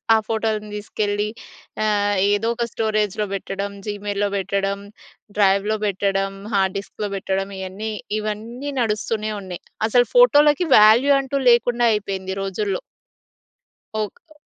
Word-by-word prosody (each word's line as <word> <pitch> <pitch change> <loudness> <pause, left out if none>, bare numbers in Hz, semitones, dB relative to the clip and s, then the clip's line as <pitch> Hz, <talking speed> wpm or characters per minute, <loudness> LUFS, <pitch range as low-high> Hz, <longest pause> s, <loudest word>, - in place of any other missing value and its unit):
ఆ - - +5
ఫోటోలను 220 -1 -1
తీసుకెళ్ళి 205 0 -2 0.6
ఆహ్, 205 -1 +1 0.2
ఏదో 205 +2 0
ఒక 235 0 -1
స్టోరేజ్‌లో 215 -2 0
పెట్టడం, 195 +1 -4
జీమెయిల్‌లో 205 -1 -2
పెట్టడం, 195 +1 -1 0.6
డ్రైవ్‌లో 200 +1 +3
పెట్టడం, 195 0 0 0.2
హార్డ్ 190 -1 +1
డిస్క్‌లో 205 +1 -6
పెట్టడం 195 0 -2
ఇయన్నీ 190 +4 -5 0.3
ఇవన్నీ 225 +6 -5
నడుస్తూనేవున్నాయి 210 -4 -2 0.3
అసలు 245 +2 +3
ఫోటోలకి 300 - +5
వాల్యూ 225 +7 +6
అంటూ 275 +1 -3
లేకుండా 240 0 +3
అయిపోయింది 195 -2 -3
ఈ - - -3
రోజుల్లో. 195 0 -2 1.2
ఒక్ 210 -2 -4
దా - - -18
210 Hz, 115 wpm, -21 LUFS, 195-220 Hz, 1.2 s, వాల్యూ